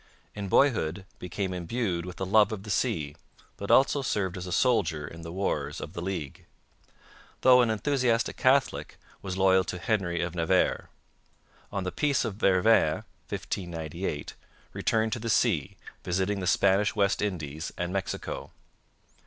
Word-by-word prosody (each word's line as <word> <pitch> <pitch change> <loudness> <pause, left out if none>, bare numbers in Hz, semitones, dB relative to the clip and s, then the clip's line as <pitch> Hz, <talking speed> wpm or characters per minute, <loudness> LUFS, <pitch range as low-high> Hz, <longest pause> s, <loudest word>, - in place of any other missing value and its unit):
In 100 -1 -5
boyhood 95 - +2
became 95 +1 -3
imbued 90 -1 -2
with 90 - -9
a - - -1
love 105 +2 +4
of 105 -3 -5
the 105 - -5
sea, 80 - -1 0.4
but 100 - -7
also 135 +1 +4
served 100 -8 -1
as 90 0 -6
a - - -5
soldier 85 - +1
in 85 - -10
the 85 0 -7
Wars 95 +3 -2
of - - -7
the 85 - -5
League. 90 -7 -5 0.9
Though 125 -1 +7
an 120 - +2
enthusiastic 115 +1 +1
Catholic, 135 +2 +1 0.2
was 95 -1 -4
loyal 95 0 +4
to 90 - -4
Henry 90 -3 -1
of 85 0 -3
Navarre. 90 +2 +1 0.8
On 100 -2 -2
the 90 - -3
Peace 145 -4 +1
of 115 - -2
Vervins 100 +3 +3 0.3
(1598) 85 -3 -4 0.4
returned 110 0 0
to 120 - -3
the 115 +1 -4
sea, 100 - +1 0.3
visiting 95 +3 0
the 90 - -3
Spanish 100 +2 +3
West 100 -1 +2
Indies 80 -6 -3
and 90 +1 -3
Mexico. 95 -1 -4
95 Hz, 155 wpm, -28 LUFS, 85-110 Hz, 0.9 s, Though